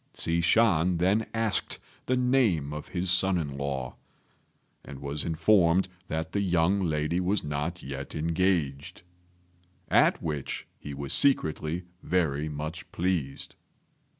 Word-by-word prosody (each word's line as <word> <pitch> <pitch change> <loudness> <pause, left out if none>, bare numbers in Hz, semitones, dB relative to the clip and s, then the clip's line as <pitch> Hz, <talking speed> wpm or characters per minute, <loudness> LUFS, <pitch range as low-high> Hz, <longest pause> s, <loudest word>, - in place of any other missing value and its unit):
Hsi 85 +1 0
Shan 90 -3 +3
then 100 +6 +2
asked 115 -2 -1 0.3
the 130 - +2
name 120 - +2
of 75 - -6
his 90 0 0
son 90 +1 +4
in 70 -5 -3
law, 70 -2 -4 0.9
and 70 - -9
was 70 +1 -3
informed 85 +2 +3 0.2
that 80 0 -3
the 100 - 0
young 90 +1 +2
lady 80 +1 0
was 95 +3 +1
not 75 +4 -3
yet 70 0 -6
engaged, 80 -3 -1 0.9
at - - +4
which 75 -4 -4
he 70 -1 -7
was 70 -1 -4
secretly 85 - +1 0.2
very 80 -4 0
much 75 +3 -6
pleased. 85 -6 -2
85 Hz, 125 wpm, -28 LUFS, 75-95 Hz, 0.9 s, son